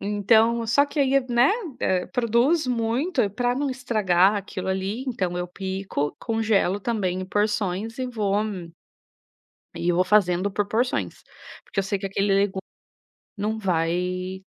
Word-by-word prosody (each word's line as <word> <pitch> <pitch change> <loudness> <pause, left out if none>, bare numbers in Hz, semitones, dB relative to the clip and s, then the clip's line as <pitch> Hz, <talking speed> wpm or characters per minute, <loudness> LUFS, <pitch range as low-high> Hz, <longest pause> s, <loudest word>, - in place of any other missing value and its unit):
Então 220 +3 +2
só 240 +6 +4
que 295 - -7
aí 275 0 +3
né, 240 +2 +4 0.6
produz 245 +6 +2
muito 250 +6 0
e 205 - +1
pra 245 +4 0
não 275 +1 -1
estragar 210 -7 +2
aquilo 190 -1 -5
ali, 190 +6 -2
então 185 -8 -2
eu 180 - -2
pico, 190 -6 -3
congelo 220 -4 +1
também 190 -5 -1
em - - -3
porções 210 +2 -1
e 255 - -2
vou 210 -5 -1 1.4
e 175 +1 0
vou 180 +2 +2
fazendo 185 -1 +2
por 205 +1 -1
porções. 240 +5 -1 0.4
Porque 205 - -9
eu - - -2
sei 200 +1 -1
que 195 - -4
aquele 195 +1 +1
legu 195 -1 +1 0.8
não 215 +2 -2
vai 185 +1 -1
205 Hz, 145 wpm, -24 LUFS, 190-235 Hz, 1.4 s, só